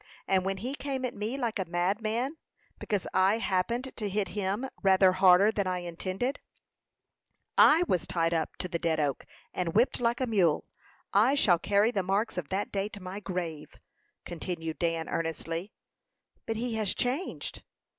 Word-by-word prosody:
and 190 -1 +3
when 195 0 -1
he 245 +7 -4
came 270 -2 -3
at 245 - -3
me 215 +6 -3
like 235 -5 -2
a 190 - -1
madman, 215 - -1 0.4
because 205 -4 -1
I 190 +3 +4
happened 230 +5 -1
to 210 -3 -2
hit 200 -1 -1
him 205 +6 -2
rather 190 -1 +5
harder 185 +2 +6
than 200 -3 -1
I 185 0 0
intended, 185 +10 -3 1.2
I 320 +3 +7
was 180 - 0
tied 165 -1 +1
up 165 -1 -1
to 180 - -4
the 170 -2 -3
Dead 165 -2 0
Oak, 145 -3 -1 0.3
and 175 -1 -2
whipped 235 +5 +3
like 235 0 +1
a 260 - +1
mule. 190 -10 +2 0.5
I 225 +8 +5
shall 180 -11 +4
carry 205 +5 +3
the 200 - 0
marks 195 +5 0
of 175 -6 -4
that 195 +2 -2
day 200 +1 -1
to 205 - -8
my 185 +1 -6
grave," 175 -6 -5 0.5
continued 165 -2 -5
Dan, 165 -1 0
earnestly. 165 +3 -3 0.8
"But 225 - -1
he 240 +1 -2
has 210 -3 0
changed." 265 +9 -2
195 Hz, 170 wpm, -29 LUFS, 175-225 Hz, 1.2 s, I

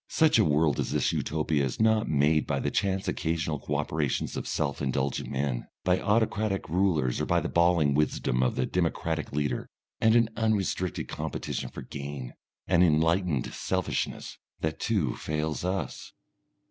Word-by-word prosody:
Such 160 -7 +4
a - - +6
world 75 -2 +2
as - - -1
this - - +1
Utopia 75 -1 0
is 65 - -3
not 110 0 +3
made 75 0 +3
by - - 0
the - - -1
chance 95 -1 0
occasional 80 -2 -1
co 75 - -3
operations 75 -1 -1
of - - -4
self 70 -2 -1
indulgent 70 -1 -1
men, 65 -2 -2 0.2
by 90 0 +2
autocratic 105 -2 +1
rulers 80 -7 +1
or - - -1
by - - +3
the - - -3
bawling 85 -4 +3
wisdom 70 -4 +1
of 65 - +1
the 65 - +1
democratic 80 -2 -1
leader. 75 0 -2 0.3
And 110 +1 +4
an 115 -1 +4
unrestricted 100 -5 0
competition 75 -2 -4
for - - -8
gain, 70 -3 -6 0.3
an 90 -1 +4
enlightened 80 -3 +2
selfishness, 95 -2 -2 0.2
that 80 0 -2
too 95 - 0
fails 75 +1 -2
us.... 95 +2 -3
80 Hz, 160 wpm, -28 LUFS, 70-95 Hz, 0.3 s, a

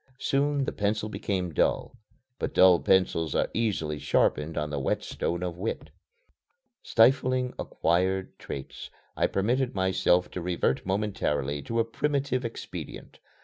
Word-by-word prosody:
Soon 140 +1 +1
the - - -2
pencil 105 +1 -1
became 95 -5 -2
dull. - - 0 0.4
But - - -3
dull 90 -2 +7
pencils 85 -5 +2
are - - +1
easily 90 -10 -1
sharpened 75 +2 +1
on 75 0 -2
the 75 - -2
whetstone 85 +5 -2
of 90 -1 -4
wit. 110 +4 -4 0.9
Stifling 130 +1 +3
acquired 95 +3 0
traits, 65 -1 -7 0.3
I - - +2
permitted 125 +6 0
myself 95 -1 +2
to 90 - -5
revert 85 -4 -1
momentarily 95 -8 -1
to 115 +11 -2
a 115 - +3
primitive 135 +1 -1
expedient. 115 -1 -7
95 Hz, 130 wpm, -27 LUFS, 85-115 Hz, 0.9 s, dull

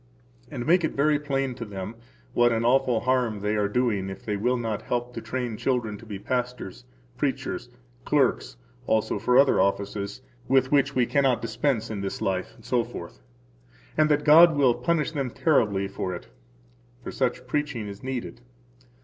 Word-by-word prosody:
And 125 -5 -5
make 175 +2 +4
it 160 - -1
very 150 +1 +3
plain 135 -3 -1
to 120 -1 -7
them 100 -1 -6 0.4
what 120 0 +4
an 115 0 0
awful 125 -2 +3
harm 125 -5 0
they 105 +1 0
are 105 -1 +1
doing 105 -5 0
if 95 - -9
they 105 - -1
will 125 +5 +1
not 115 -3 -3
help 120 0 -3
to - - -5
train 125 -4 -3
children 120 -5 -1
to 115 - -14
be 105 -2 -5
pastors, 125 - -4 0.3
preachers, - - -2 0.3
clerks - - +1 0.3
[also 110 -2 +1
for 125 +4 +3
other 135 0 +5
offices, 100 +3 -2 0.2
with 130 0 +3
which 140 -1 +3
we 125 -1 +3
cannot 135 -2 +2
dispense 115 0 -1
in 100 -2 -4
this 95 - -4
life], 95 -1 -2
etc., 120 -8 -3 0.8
and 155 0 +3
that 150 0 +2
God 160 +2 +8
will 130 -4 +5
punish 165 +1 0
them 140 -5 -2
terribly 110 -9 +1
for 95 -2 -4
it. - - -10 0.7
For - - -5
such - - -1
preaching 145 -8 -2
is 100 0 -8
needed. 130 -2 -5
120 Hz, 170 wpm, -26 LUFS, 105-135 Hz, 0.8 s, God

